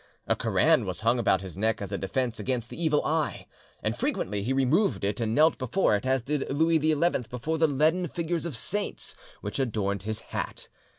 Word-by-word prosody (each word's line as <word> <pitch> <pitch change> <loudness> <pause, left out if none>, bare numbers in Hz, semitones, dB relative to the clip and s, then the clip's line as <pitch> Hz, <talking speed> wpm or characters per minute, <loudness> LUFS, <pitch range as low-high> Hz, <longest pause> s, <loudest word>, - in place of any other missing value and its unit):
A - - +2
Koran - - +3
was - - -3
hung 115 +2 +2
about 95 -4 +3
his 95 -4 -8
neck 110 +3 +1
as 100 -1 -5
a 100 - -1
defence 115 +4 -1
against 125 -3 -2
the 170 - -5
evil 150 -2 +2
eye, 155 -1 -1 0.4
and - - 0
frequently 100 +1 -1
he 115 +6 -2
removed 135 - +2
it 105 +4 -1
and 110 0 0
knelt 155 +1 +4
before 130 - +2
it, 105 +6 -2
as 130 -2 +2
did 145 +2 -2
Louis 160 +3 +3
XI 155 +1 +2 0.3
before 155 +6 -2
the 160 - +5
leaden 155 +5 +2
figures 170 +1 -2
of 145 -8 -4
saints 205 - -3 0.3
which - - -4
adorned 105 -6 -1
his 110 +2 -3
hat. - - -4
130 Hz, 200 wpm, -27 LUFS, 110-160 Hz, 0.4 s, the